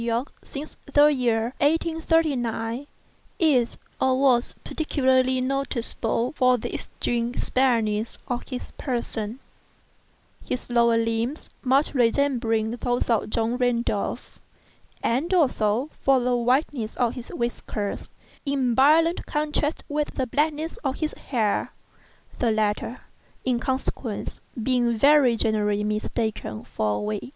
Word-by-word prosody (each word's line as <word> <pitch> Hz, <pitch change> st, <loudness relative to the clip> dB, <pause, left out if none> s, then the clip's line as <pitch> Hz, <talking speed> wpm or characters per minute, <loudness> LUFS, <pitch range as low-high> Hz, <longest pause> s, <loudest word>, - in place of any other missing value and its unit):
Y., 235 Hz, +1 st, 0 dB, 0.2 s
since 295 Hz, +2 st, -8 dB
the 295 Hz, +1 st, +6 dB
year 235 Hz, -2 st, 0 dB
1839, 290 Hz, -6 st, +1 dB, 0.5 s
is 280 Hz, -, +2 dB, 0.2 s
(or 260 Hz, 0 st, +2 dB
was) 255 Hz, -3 st, +3 dB
particularly 260 Hz, -4 st, +1 dB
noticeable 255 Hz, -3 st, -1 dB
for 255 Hz, -1 st, +4 dB
the -, -, -5 dB
extreme 240 Hz, 0 st, -2 dB
spareness 230 Hz, -4 st, +1 dB
of 245 Hz, -1 st, -2 dB
his 250 Hz, -, -6 dB
person—his 245 Hz, +1 st, -7 dB
lower 235 Hz, -1 st, +4 dB
limbs 230 Hz, +5 st, -2 dB
much 270 Hz, +3 st, +2 dB
resembling 230 Hz, -3 st, +2 dB
those 245 Hz, 0 st, -1 dB
of 225 Hz, -2 st, +1 dB
John 230 Hz, +2 st, 0 dB
Randolph; 245 Hz, -1 st, -1 dB, 0.6 s
and, 270 Hz, +10 st, 0 dB
also, 255 Hz, -, +2 dB
for 270 Hz, -1 st, +4 dB
the 250 Hz, 0 st, +1 dB
whiteness 245 Hz, -1 st, 0 dB
of 240 Hz, -2 st, +1 dB
his 245 Hz, -2 st, -8 dB
whiskers, 225 Hz, -4 st, -3 dB, 0.3 s
in 270 Hz, -4 st, +1 dB
violent 315 Hz, +7 st, +4 dB
contrast 300 Hz, 0 st, -1 dB
to 300 Hz, +1 st, 0 dB
the 260 Hz, -, 0 dB
blackness 300 Hz, +5 st, -1 dB
of 270 Hz, -2 st, -2 dB
his 310 Hz, -1 st, -2 dB
hair—the 230 Hz, +1 st, -3 dB
latter, 215 Hz, +2 st, -1 dB, 0.4 s
in 250 Hz, -2 st, +1 dB
consequence, 260 Hz, -3 st, -3 dB, 0.2 s
being 240 Hz, -2 st, +2 dB
very 275 Hz, -1 st, +5 dB
generally 210 Hz, -2 st, +1 dB
mistaken 210 Hz, -, -2 dB
for 105 Hz, -1 st, -1 dB
a -, -, -2 dB
wig. 210 Hz, +3 st, -3 dB
245 Hz, 115 wpm, -25 LUFS, 230-275 Hz, 0.6 s, the